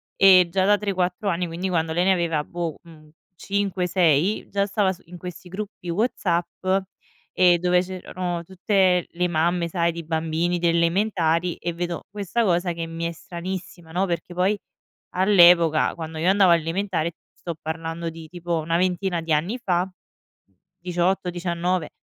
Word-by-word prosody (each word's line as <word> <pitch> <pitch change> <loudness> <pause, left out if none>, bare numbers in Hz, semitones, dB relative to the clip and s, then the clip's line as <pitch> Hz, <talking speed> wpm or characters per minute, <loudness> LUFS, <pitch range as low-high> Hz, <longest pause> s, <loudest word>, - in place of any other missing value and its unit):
e 185 -2 +7
già 190 +1 +2
da 205 +1 +5
3-4 195 -1 -1
anni, 175 0 -1
quindi 170 +3 -4
quando 165 -2 0
lei 175 +2 +2
ne 190 - +5
aveva, 165 -4 0
boh, 170 -1 -4
mhmm, 155 -3 -16 0.3
5-6, 185 -2 +1
già 200 0 0
stava 195 -2 +1
su 175 - -17
in 175 +1 -11
questi 180 0 -9
gruppi 195 -2 -7
WhatsApp, 175 -3 -1 0.7
ehm, 180 -1 +6
dove 180 +1 +2
c'erano 180 -1 -4
tutte 185 -1 +2
le 180 +1 -1
mamme, 170 +1 +1
sai, 170 0 0
di 170 0 -7
bambini, 165 +2 -1
delle 170 -1 +2
elementari 170 -1 +1
e 175 - -3
vedo 175 0 -4
questa 205 +3 -1
cosa 175 -1 +1
che 165 -1 -4
mi 165 0 -6
è 170 - -1
stranissima, 175 0 -7
no, 180 +4 +1
perché 175 -1 -4
poi, 185 +4 +1 0.5
all'epoca, 175 -4 +5
quando 160 -1 -6
io 165 +3 +1
andavo 195 -1 +5
alle 170 -1 +4
elementari, 170 0 -1 0.2
sto 170 - -6
parlando 165 +1 -4
di, 165 0 -10
tipo, 175 0 -3
una 165 +1 0
ventina 180 0 0
di 165 -1 -2
anni 170 +11 0
fa, 180 0 +1 0.9
18-19, 175 -1 -1
175 Hz, 160 wpm, -24 LUFS, 170-185 Hz, 0.9 s, e